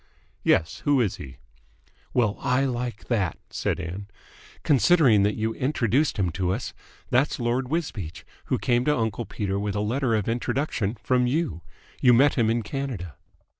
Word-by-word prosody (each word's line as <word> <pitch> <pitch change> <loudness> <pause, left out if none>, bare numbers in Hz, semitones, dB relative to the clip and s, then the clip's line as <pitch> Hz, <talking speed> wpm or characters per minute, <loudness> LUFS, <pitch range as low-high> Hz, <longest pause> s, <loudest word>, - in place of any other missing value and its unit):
"Yes. 80 - +2
Who 145 -2 +2
is 110 -6 0
he?" 65 -3 -10 0.7
"Well, 110 -5 +2
I 135 0 +1
like 120 -3 -3
that!" 100 -9 0
said - - -1
Ann. 90 +3 -6 0.6
"Considering 140 - +5
that 105 +1 +2
you 110 0 -1
introduced 130 +1 +1
him 95 -4 +1
to 90 +2 -1
us! - - -6 0.4
That's 130 +4 +2
Lord 120 +2 0
Wisbeach, 135 - -4 0.2
who - - 0
came 120 0 +1
to 150 -2 +2
uncle 110 0 -2
Peter 100 -2 -2
with 100 0 -2
a - - 0
letter 115 +3 0
of 105 -3 -1
introduction 120 -2 -1
from 125 -1 +2
you. 125 - -1 0.4
You 125 -2 +6
met 140 +4 +5
him 115 -4 +2
in 115 0 0
Canada." 115 - -4
120 Hz, 165 wpm, -25 LUFS, 100-130 Hz, 0.7 s, You